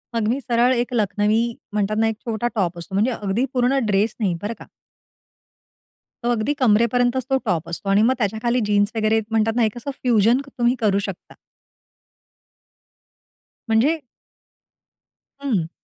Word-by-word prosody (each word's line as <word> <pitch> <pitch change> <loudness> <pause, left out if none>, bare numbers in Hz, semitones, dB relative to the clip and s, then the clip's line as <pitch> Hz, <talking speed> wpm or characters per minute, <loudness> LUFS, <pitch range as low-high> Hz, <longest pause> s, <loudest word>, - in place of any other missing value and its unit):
मग 225 -2 0
मी 245 +5 0
सरळ 245 0 +2
एक 245 +1 -1
लखनवी 210 0 +1 0.3
म्हणतात 210 0 0
ना, 225 0 +3
एक 225 - -1
छोटा 230 0 -1
टॉप 180 -4 -1
असतो 170 +2 -9
म्हणजे 215 +6 +2
अगदी 210 +2 -1
पूर्ण 255 +1 +2
ड्रेस 210 +1 +1
नाही 200 -5 +1
बरं 205 +3 -3
का. - - -11 1.6
अगदी 240 +3 +1
कमरेपर्यंतच 245 +2 +2
तो 270 - +3
टॉप 170 -5 -1
असतो. 175 +4 -5
आणि 200 +1 +4
मग 240 +4 +4
त्याच्याखाली 230 +3 0
जीन्स 205 0 +2
वगैरे 220 0 +2
म्हणतात 225 0 +2
ना 240 - +3
एक 215 +2 -3
असं 260 +4 -5
फ्युजन 235 0 +3 0.2
तुम्ही 240 +1 +2
करू 200 -3 +2
शकता. 185 - -10 2.4
म्हणजे 270 +9 +3 1.4
हं. 210 -13 -1
225 Hz, 145 wpm, -22 LUFS, 205-245 Hz, 2.4 s, आणि